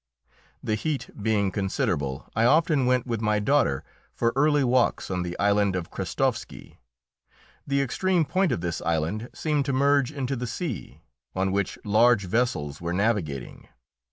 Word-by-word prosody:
The 110 - -1
heat 140 +6 -2
being 100 -2 +1
considerable, 85 -9 -2
I 115 - +2
often 150 -1 +3
went 125 -1 +2
with 115 -3 -3
my 105 -1 +2
daughter 105 - +2 0.3
for 115 0 +1
early 145 +1 +3
walks 125 -5 +1
on 90 -1 -1
the 90 0 -4
island 100 -1 +2
of 90 -3 -4
Krestovski. - - -3 0.9
The 140 0 +2
extreme 175 +6 +1
point 185 +2 +1
of 105 - -1
this 85 -1 -3
island 85 +8 -1
seemed 150 -3 -1
to 140 - -1
merge 140 0 +3
into 135 -2 -3
the 125 0 -4
sea, 150 - -5 0.3
on 95 0 0
which 100 -1 -1
large 110 0 +4
vessels 90 - -1
were 85 0 -2
navigating. 90 - -2
115 Hz, 155 wpm, -26 LUFS, 95-140 Hz, 0.9 s, large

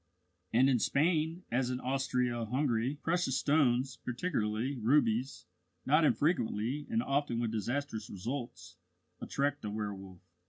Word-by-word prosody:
And 125 +4 +5
in 130 -3 +3
Spain, 160 - +1
as 125 +1 +1
in 125 0 -2
Austria 125 -3 0
Hungary, 125 +1 0
precious 165 -6 +1
stones 130 -4 +2
particularly 125 -2 -2
rubies 120 0 +1 0.4
not 150 +4 +4
infrequently, 145 - +1
and 230 0 +1
often 140 -4 0
with 115 -2 -1
disastrous 115 0 -3
results, 120 +5 -6 0.4
attract 145 +1 -1
the 105 - -4
werwolf. 100 -3 -5
125 Hz, 120 wpm, -32 LUFS, 115-145 Hz, 0.4 s, And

